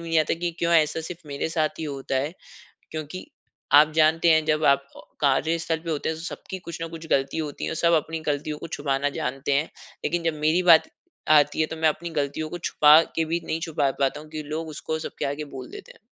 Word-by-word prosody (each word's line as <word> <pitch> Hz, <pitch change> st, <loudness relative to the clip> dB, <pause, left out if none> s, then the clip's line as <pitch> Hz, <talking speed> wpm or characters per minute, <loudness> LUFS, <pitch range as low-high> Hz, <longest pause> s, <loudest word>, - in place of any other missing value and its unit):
नहीं 165 Hz, -1 st, +3 dB
आता 155 Hz, -, 0 dB
कि 175 Hz, +1 st, -2 dB
क्यों 170 Hz, 0 st, +2 dB
ऐसा 160 Hz, 0 st, +3 dB
सिर्फ़ 165 Hz, -1 st, -9 dB
मेरे 140 Hz, +2 st, -3 dB
साथ 155 Hz, -1 st, -1 dB
ही 160 Hz, -, -3 dB
होता 135 Hz, -2 st, -3 dB
है। 140 Hz, +4 st, -1 dB, 0.6 s
क्योंकि 155 Hz, +3 st, -6 dB, 0.6 s
आप 155 Hz, -, 0 dB
जानते 160 Hz, +2 st, +4 dB
हैं 160 Hz, -1 st, +4 dB
जब 155 Hz, 0 st, +1 dB
आप 140 Hz, 0 st, -4 dB
ओ -, -, -10 dB, 0.2 s
कार्यस्थल 160 Hz, +4 st, +1 dB
पे 165 Hz, -, -2 dB
होते 150 Hz, 0 st, -2 dB
हैं 160 Hz, -, -3 dB
तो 160 Hz, -, -9 dB
सबकी 190 Hz, +2 st, -7 dB
कुछ 165 Hz, 0 st, -6 dB
ना 165 Hz, -, -2 dB
कुछ 165 Hz, 0 st, -9 dB
गलती 135 Hz, +3 st, +1 dB
होती 150 Hz, -3 st, -4 dB
है -, -, -3 dB
सब 170 Hz, +1 st, +3 dB
अपनी 165 Hz, 0 st, -5 dB
गलतियों 150 Hz, +1 st, -2 dB
को -, -, -7 dB
छुपाना 140 Hz, 0 st, 0 dB
जानते 135 Hz, +2 st, -2 dB
हैं। 150 Hz, +4 st, +1 dB, 0.4 s
लेकिन 175 Hz, -1 st, -1 dB
जब 165 Hz, -2 st, 0 dB
मेरी 160 Hz, +4 st, +3 dB
बात 170 Hz, -3 st, +6 dB, 0.4 s
आती 150 Hz, 0 st, +4 dB
है 155 Hz, -, +3 dB
तो -, -, -6 dB
मैं 160 Hz, 0 st, +4 dB
अपनी 170 Hz, +3 st, -5 dB
गलतियों 145 Hz, +3 st, -4 dB
को 175 Hz, -, -5 dB
छुपा 155 Hz, -2 st, +6 dB, 0.2 s
के 165 Hz, -, +1 dB
भी 165 Hz, +2 st, -1 dB
नहीं 160 Hz, -, -2 dB
छुपा 155 Hz, -5 st, 0 dB
पाता 135 Hz, +1 st, +1 dB
हूँ 155 Hz, -, -14 dB
क्योंकि 155 Hz, -1 st, -7 dB
लोग 160 Hz, +1 st, -3 dB
उसको 160 Hz, +1 st, -4 dB
सब 155 Hz, -, -5 dB
आगे 145 Hz, +2 st, -4 dB
बोल 130 Hz, -1 st, -7 dB
देते -, -, -10 dB
हैं। -, -, -22 dB
155 Hz, 235 wpm, -25 LUFS, 145-165 Hz, 0.6 s, बात